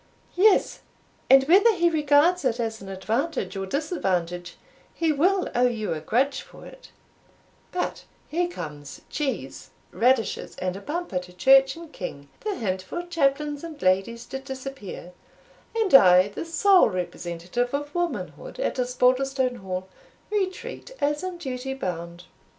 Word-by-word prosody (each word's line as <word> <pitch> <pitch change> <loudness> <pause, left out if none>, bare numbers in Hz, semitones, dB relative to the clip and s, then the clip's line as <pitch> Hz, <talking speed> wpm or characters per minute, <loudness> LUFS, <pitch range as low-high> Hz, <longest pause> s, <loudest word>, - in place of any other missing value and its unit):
"Yes; 395 +2 +4 0.5
and 270 0 +8
whether 390 +9 +5
he 345 -1 +3
regards 310 +2 +3
it 250 -2 0
as 225 -2 -3
an 195 - -9
advantage 210 - -2
or 195 0 -3
disadvantage, 180 - -2 0.4
he 330 -2 +1
will 365 +6 +2
owe 250 +1 +4
you 220 -6 -2
a 155 - -4
grudge 260 - +1
for - - -14
it - - -13 0.8
But 360 - -3 0.2
here 345 +3 0
comes 150 - -8
cheese, 290 -3 -3 0.2
radishes, 245 -3 +1
and 185 0 -3
a 195 - -7
bumper 300 - -3
to 180 0 -12
church 270 +8 +5
and 330 -1 -11
king, 140 -6 -7
the 425 -2 -3
hint 190 - -2
for 345 - -5
chaplains 295 -3 0
and 320 -3 -8
ladies 195 +6 +1
to 270 - -2
disappear; 265 -9 -8 0.6
and 440 -7 0
I, 185 -6 +8
the 205 - -6
sole 370 - +5
representative 180 +5 -3
of 290 +1 -4
womanhood 350 +8 -4
at - - -1
Osbaldistone 255 +1 +1
Hall, 185 -2 -5 0.4
retreat, 380 -3 -3
as 295 +3 0
in 370 -1 -4
duty 265 -4 -4
bound." 170 -6 -5
265 Hz, 145 wpm, -25 LUFS, -, 0.8 s, and